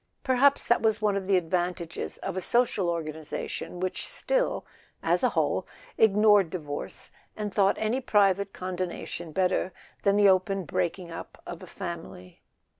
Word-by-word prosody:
Perhaps 275 +2 +3
that 240 - +3
was 220 -1 +2
one 210 -2 +1
of 195 -1 -3
the 195 -1 +4
advantages 175 0 -2
of 195 - -5
a 185 - -2
social 225 -5 +2
organization 160 +1 -4
which 185 0 -2
still, - - 0 0.4
as - - +3
a - - +5
whole, - - 0 0.3
ignored 210 -3 +5
divorce, 150 -5 -6 0.3
and 210 -2 -3
thought 195 -1 +3
any 220 +5 0
private 200 -4 +3
condonation 180 -2 -5
better 185 +2 +1 0.3
than 200 0 +3
the 205 0 +6
open 190 +1 +3
breaking 175 +1 -2
up 165 - -8
of 175 - -7
the 185 - -11
family. 170 - -8
190 Hz, 150 wpm, -27 LUFS, 175-210 Hz, 0.4 s, the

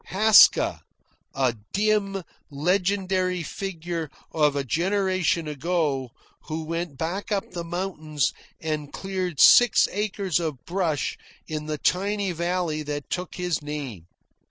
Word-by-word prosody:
Haska 215 +3 +6 0.5
a 130 -3 +1 0.2
dim 200 -2 +1 0.3
legendary 185 +3 0
figure 170 -3 -4 0.2
of 150 -3 +2
a 140 - 0
generation 185 - 0
ago, 150 -3 -1 0.4
who 160 +1 -4
went 165 -2 -4
back 175 +8 -3
up 200 -2 -1
the 170 - -4
mountain 170 -3 -5 0.4
and 155 -2 -3
cleared 185 -5 -4
six 245 +6 +7
acres 200 -4 -1
of 155 -7 -4
brush 170 -5 -1 0.3
in 155 -1 -4
the 155 -1 -2
tiny 200 +4 0
valley 170 -2 -1
that 145 -1 -5
took 180 0 -3
his 180 -3 -1
name. 140 - -6
170 Hz, 120 wpm, -25 LUFS, 150-190 Hz, 0.5 s, six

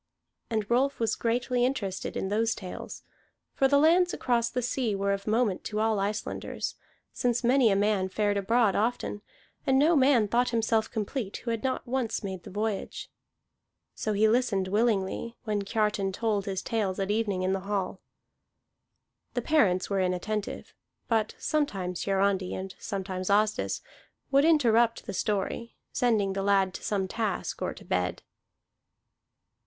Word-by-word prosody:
And 215 -3 -1
Rolf 260 +4 +1
was 225 -1 +1
greatly 245 +1 0
interested 225 -8 -2
in 190 - -2
those 225 +2 +1
tales; 185 -3 -8 0.5
for 270 - +3
the 280 +1 +4
lands 345 +4 +4
across 235 -2 +1
the 250 +1 -2
sea 245 -3 0
were 200 0 0
of 200 +1 -5
moment 215 -3 +1
to 210 - -2
all 220 -1 +2
Icelanders, 205 +2 -3 0.4
since 240 0 0
many 250 0 +5
a 195 - +3
man 200 -2 +1
fared 205 +1 0
abroad 210 +1 +2
often, 220 -1 -1 0.5
and 265 0 +4
no 315 +5 +5
man 260 -6 +4
thought 240 +4 +2
himself 225 -1 +1
complete 215 -1 -3
who 235 - 0
had 230 -1 -3
not 260 -1 -1
once 240 -3 -2
made 190 -2 -4
the - - -11
voyage. 210 +1 -3 0.8
So 215 - -2
he 210 +2 +4
listened 215 -5 +1
willingly, 220 +1 0
when 210 -3 -1
Kiartan 205 -1 0
told 210 -2 -1
his 190 -1 -2
tales 205 -5 -1
at 195 +1 0
evening 205 -4 0
in 185 +1 +1
the 195 - 0
hall. 195 -1 -3 1.4
The - - -1
parents 200 - +3
were 195 -1 0
inattentive; 185 +3 -2 0.4
but 220 -2 +1
sometimes 195 - -1
Hiarandi, 195 -1 +1
and 190 0 -5
sometimes 190 -2 -4
Asdis, 215 +1 +1 0.5
would 275 +2 +5
interrupt 235 -7 +3
the 200 - -5
story, 210 +4 -2 0.2
sending 215 -6 +2
the 195 - -2
lad 195 -1 +2
to - - -8
some 195 -2 0
task 220 +1 -3
or - - -2
to - - -13
bed. 90 0 -1
215 Hz, 155 wpm, -28 LUFS, 195-235 Hz, 1.4 s, many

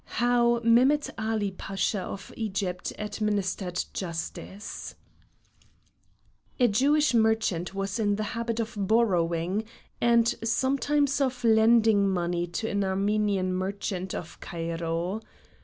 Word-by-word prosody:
HOW 240 -1 +3
MEHMET 255 +6 +4
ALI 215 -2 -1
PASHA 195 +1 -2
OF 195 +1 -7
EGYPT 190 -4 -3
ADMINISTERED 205 -3 -2
JUSTICE 185 +3 -6 1.6
A 245 - +5
Jewish 285 +7 +3
merchant 220 -6 +1
was 195 +3 -2
in 205 -2 +2
the 215 - -2
habit 230 -1 -2
of 225 0 -2
borrowing, 190 -3 +1 0.4
and 235 0 +4
sometimes 275 +4 +1
of 255 -2 -1
lending 220 -2 +5
money 175 -1 -1
to 175 +6 -3
an 200 -1 0
Armenian 195 -1 0
merchant 190 0 -3
of 175 - -7
Cairo. 170 +3 -3
210 Hz, 105 wpm, -27 LUFS, 185-230 Hz, 1.6 s, A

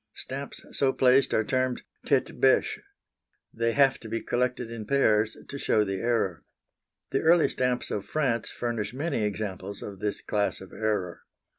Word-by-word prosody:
Stamps 140 +1 -6
so 135 -1 +2
placed 130 +1 +4
are 110 - +2
termed 130 +2 0 0.2
tête - - +1
bêche. - - +4 0.7
They 115 0 0
have 135 0 +4
to 115 - -9
be 115 +1 -1
collected 125 -1 -1
in 110 -2 -6
pairs 110 -5 +3
to 140 - -6
show 110 - +3
the 95 -2 -3
error. 115 -8 0 0.7
The 135 - +2
early 165 +1 +5
stamps 125 -1 -1
of 100 - -2
France 130 -7 0
furnish 115 -2 -3
many 140 -5 -1
examples 100 -1 -4
of 100 -2 -8
this 105 0 -2
class 105 -1 -1
of 95 - -12
error. 105 -5 -2
115 Hz, 160 wpm, -27 LUFS, 105-130 Hz, 0.7 s, early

